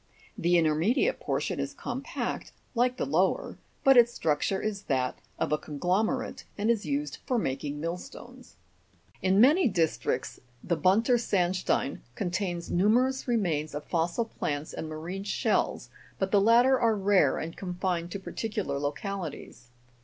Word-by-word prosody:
The 175 Hz, +1 st, +2 dB
intermedi 165 Hz, -, +2 dB
ate -, -, -1 dB
portion -, -, -2 dB
is -, -, -3 dB
compact, -, -, -4 dB, 0.2 s
like 250 Hz, +1 st, +1 dB
the -, -, -1 dB
lower, -, -, 0 dB, 0.2 s
but 270 Hz, -1 st, +6 dB
its 240 Hz, 0 st, +7 dB
structure 165 Hz, +2 st, 0 dB
is 205 Hz, -1 st, -3 dB
that 130 Hz, -2 st, -1 dB, 0.2 s
of -, -, -1 dB
a 150 Hz, -, +2 dB
conglomerate, 185 Hz, -, -1 dB
and 210 Hz, +3 st, +2 dB
is 220 Hz, -3 st, -1 dB
used 290 Hz, +1 st, -2 dB
for 255 Hz, -, +1 dB
mak 135 Hz, -, -2 dB
ing 145 Hz, 0 st, -4 dB
millstones. 175 Hz, -, -7 dB, 0.7 s
In 190 Hz, +1 st, +3 dB
many 295 Hz, -, +6 dB
districts 170 Hz, -7 st, -1 dB, 0.2 s
the 170 Hz, -, 0 dB
Bunter 205 Hz, -, +3 dB
sandstein 185 Hz, -, 0 dB, 0.2 s
contains 175 Hz, -2 st, -2 dB
numerous 245 Hz, +9 st, +2 dB
remains 165 Hz, -11 st, 0 dB
of 150 Hz, -, -4 dB
fossil 170 Hz, +6 st, 0 dB
plants 150 Hz, -8 st, -4 dB
and 160 Hz, -, -5 dB
marine 165 Hz, +5 st, -5 dB
shells, 200 Hz, -, 0 dB, 0.3 s
but 190 Hz, 0 st, -1 dB
the 205 Hz, -, +5 dB
latter 240 Hz, +5 st, +5 dB
are 225 Hz, -2 st, +3 dB
rare 195 Hz, -8 st, +3 dB
and 165 Hz, +1 st, -5 dB
con 180 Hz, -2 st, -5 dB
fined 175 Hz, -2 st, -1 dB
to 200 Hz, -, -5 dB
particular 195 Hz, -7 st, -3 dB
localities. 145 Hz, -, -5 dB
190 Hz, 150 wpm, -28 LUFS, 160-230 Hz, 0.7 s, its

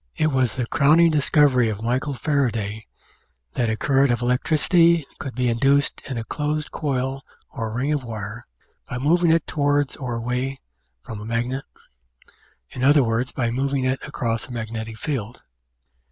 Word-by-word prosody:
It 155 Hz, 0 st, +1 dB
was 130 Hz, -4 st, +1 dB
the 125 Hz, -2 st, -1 dB
crowning 160 Hz, +5 st, +4 dB
discovery 140 Hz, -5 st, +3 dB
of 105 Hz, 0 st, -5 dB
Michael 130 Hz, +4 st, -1 dB
Faraday 115 Hz, -8 st, -1 dB, 0.7 s
that 120 Hz, -3 st, 0 dB
a 110 Hz, -, -1 dB
current 135 Hz, +1 st, +3 dB
of 120 Hz, 0 st, -1 dB
electricity 165 Hz, +6 st, +3 dB
could 135 Hz, -4 st, -6 dB
be 125 Hz, 0 st, 0 dB
induced 135 Hz, +4 st, +2 dB
in 130 Hz, -, -3 dB
a 115 Hz, -, -3 dB
closed 150 Hz, +4 st, -3 dB
coil 135 Hz, -2 st, -2 dB, 0.3 s
or 115 Hz, -4 st, -4 dB
ring 130 Hz, +6 st, -1 dB
of 145 Hz, -3 st, -1 dB
wire 110 Hz, 0 st, -7 dB, 0.4 s
by 125 Hz, -, -3 dB
moving 165 Hz, +6 st, +3 dB
it 165 Hz, -1 st, +2 dB
towards 145 Hz, -1 st, 0 dB
or 125 Hz, -3 st, -4 dB
away 125 Hz, +3 st, -2 dB, 0.4 s
from 110 Hz, -, -7 dB
a -, -, -7 dB
magnet 120 Hz, +4 st, -2 dB, 1.1 s
in 130 Hz, -, -5 dB
other 145 Hz, +1 st, +6 dB
words, 115 Hz, +2 st, -1 dB
by 120 Hz, -2 st, -1 dB
moving 135 Hz, +2 st, -1 dB
it 130 Hz, +1 st, 0 dB
across 115 Hz, -2 st, -2 dB
a -, -, -11 dB
magnetic 110 Hz, -1 st, -5 dB
field. 120 Hz, -4 st, -4 dB
130 Hz, 160 wpm, -23 LUFS, 115-145 Hz, 1.1 s, other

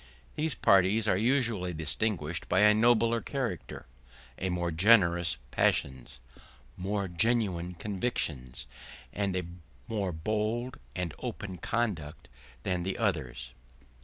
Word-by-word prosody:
These 155 Hz, -2 st, 0 dB
parties 100 Hz, +3 st, +4 dB
are 95 Hz, -, +4 dB
usually 110 Hz, -5 st, +1 dB
distinguished 80 Hz, +1 st, -1 dB
by 90 Hz, +2 st, +4 dB
a 105 Hz, 0 st, +7 dB
nobler 115 Hz, +1 st, +3 dB
character, 125 Hz, -, -4 dB, 0.5 s
by 95 Hz, -, -1 dB
more 85 Hz, -1 st, -1 dB
generous 85 Hz, -, +4 dB
passions, 65 Hz, -3 st, 0 dB, 0.6 s
more 100 Hz, +2 st, -2 dB
genuine 90 Hz, -2 st, 0 dB
convictions, 80 Hz, -, -3 dB, 0.5 s
and 100 Hz, -2 st, -1 dB
a 90 Hz, -2 st, -1 dB, 0.4 s
more 105 Hz, -5 st, -1 dB
bold 110 Hz, +8 st, -2 dB, 0.2 s
and 90 Hz, -3 st, -3 dB
open 100 Hz, -7 st, -5 dB
conduct 85 Hz, -11 st, -2 dB, 0.3 s
than 90 Hz, -2 st, -1 dB
the 95 Hz, +2 st, -3 dB
others. 65 Hz, -, -2 dB
95 Hz, 110 wpm, -30 LUFS, 85-110 Hz, 0.6 s, a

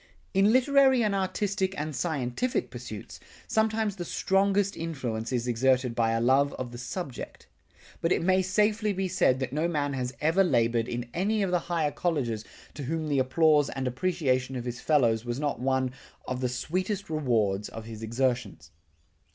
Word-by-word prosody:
In 195 Hz, +2 st, +4 dB
literary 265 Hz, 0 st, +5 dB
and 210 Hz, -2 st, +1 dB
artistic 190 Hz, 0 st, -1 dB
and 150 Hz, 0 st, -3 dB
scientific 145 Hz, -, -1 dB
pursuits, -, -, -8 dB, 0.3 s
sometimes 220 Hz, -2 st, +1 dB
the 175 Hz, -, -3 dB
strongest 195 Hz, +3 st, +1 dB
influence 130 Hz, -9 st, -4 dB
is 125 Hz, -1 st, -1 dB
exerted 125 Hz, +1 st, +2 dB
by 115 Hz, -1 st, +1 dB
a 115 Hz, -, +1 dB
love 135 Hz, +4 st, +3 dB
of 125 Hz, -2 st, -5 dB
the 120 Hz, -, -8 dB
subject. 135 Hz, 0 st, -6 dB, 0.6 s
But 165 Hz, -, +1 dB
it -, -, +2 dB
may 185 Hz, +1 st, +3 dB
safely 210 Hz, +3 st, +1 dB
be 190 Hz, 0 st, -1 dB
said 150 Hz, -8 st, +2 dB
that 130 Hz, -1 st, -3 dB
no 155 Hz, +3 st, +1 dB
man 145 Hz, -4 st, -1 dB
has 125 Hz, -2 st, -2 dB
ever 165 Hz, +6 st, +3 dB
labored 115 Hz, -7 st, +2 dB
in 120 Hz, 0 st, -4 dB
any 205 Hz, +4 st, +1 dB
of 190 Hz, -, -1 dB
the 180 Hz, -, +3 dB
higher 160 Hz, -4 st, +1 dB
colleges 130 Hz, -12 st, -1 dB, 0.3 s
to 145 Hz, -, -6 dB
whom 160 Hz, +2 st, -2 dB
the 140 Hz, -2 st, +2 dB
applause 150 Hz, +2 st, +3 dB
and 135 Hz, -1 st, -4 dB
appreciation 130 Hz, -2 st, 0 dB
of 125 Hz, -1 st, -4 dB
his 120 Hz, 0 st, -5 dB
fellows 120 Hz, -7 st, +3 dB
was 120 Hz, +1 st, -3 dB
not 145 Hz, -5 st, -1 dB
one 130 Hz, 0 st, 0 dB, 0.4 s
of 130 Hz, 0 st, -3 dB
the 125 Hz, -, 0 dB
sweetest 185 Hz, -, -2 dB
rewards 115 Hz, -10 st, 0 dB
of 115 Hz, -1 st, -8 dB
his 110 Hz, -1 st, -8 dB
exertions. 120 Hz, -, -2 dB
145 Hz, 175 wpm, -28 LUFS, 125-185 Hz, 0.6 s, literary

